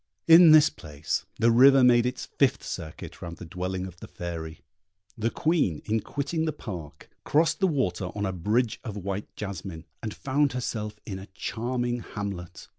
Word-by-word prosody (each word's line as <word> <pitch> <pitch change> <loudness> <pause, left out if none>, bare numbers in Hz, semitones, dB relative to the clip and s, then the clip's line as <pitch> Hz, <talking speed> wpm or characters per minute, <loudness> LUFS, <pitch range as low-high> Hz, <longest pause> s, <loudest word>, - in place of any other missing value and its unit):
In 165 +1 +9
this 155 -1 +7
place, 75 -2 -4
the 115 +1 +4
river 135 +3 +7
made 120 -1 +5
its 125 0 -4
fifth 135 -1 +1
circuit 80 -3 -7
round 85 -1 -7
the - - -9
dwelling 90 +2 -4
of 90 -2 -10
the - - -9
Fairy. 85 -2 -6 0.5
The 115 -1 0
Queen, 155 - 0
in 110 +1 +1
quitting 145 +7 -2
the 155 - 0
park, 90 - -9
crossed 160 +3 +2
the 190 - +3
water 95 - 0
on 105 0 -1
a 95 - -2
bridge 110 +7 0
of 110 -5 -6
white 100 +1 -4
jasmine, 95 -4 -6 0.2
and 110 - -4
found 140 +3 0
herself 105 -4 -4
in 95 -2 -5
a 95 - -10
charming 120 0 -2
hamlet. 100 -6 -6
110 Hz, 175 wpm, -27 LUFS, 90-130 Hz, 0.5 s, In